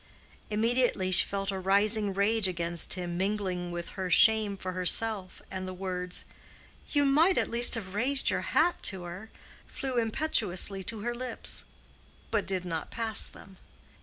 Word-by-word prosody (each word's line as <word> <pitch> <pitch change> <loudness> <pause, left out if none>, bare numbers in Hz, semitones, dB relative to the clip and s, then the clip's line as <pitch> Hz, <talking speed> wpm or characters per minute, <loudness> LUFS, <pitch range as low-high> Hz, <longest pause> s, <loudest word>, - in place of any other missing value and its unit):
Immediately 225 -3 0
she 185 - +4
felt 195 0 -3
a 190 - -4
rising 205 +2 +3
rage 205 +1 +2
against 170 -2 0
him 175 -1 -5
mingling 190 -3 -2
with 175 0 -6
her 190 -2 -5
shame 215 +1 +5
for 185 -1 -5
herself, 185 +2 0
and 185 0 -5
the 185 - -7
words, 180 -1 -5 0.6
"You 290 -1 +1
might 315 +7 +3
at - - 0
least 240 +1 +5
have 195 -4 -6
raised 265 +6 +2
your - - -1
hat 345 +3 +1
to 190 -3 -7
her," 180 +5 -9 0.4
flew 260 -3 -3
impetuously 215 - -1
to 220 +1 -3
her 240 +2 -3
lips—but 235 -3 -6
did 185 -2 -2
not 165 -2 -5
pass 225 -2 +2
them. 190 -1 -14
200 Hz, 155 wpm, -28 LUFS, 185-225 Hz, 0.6 s, shame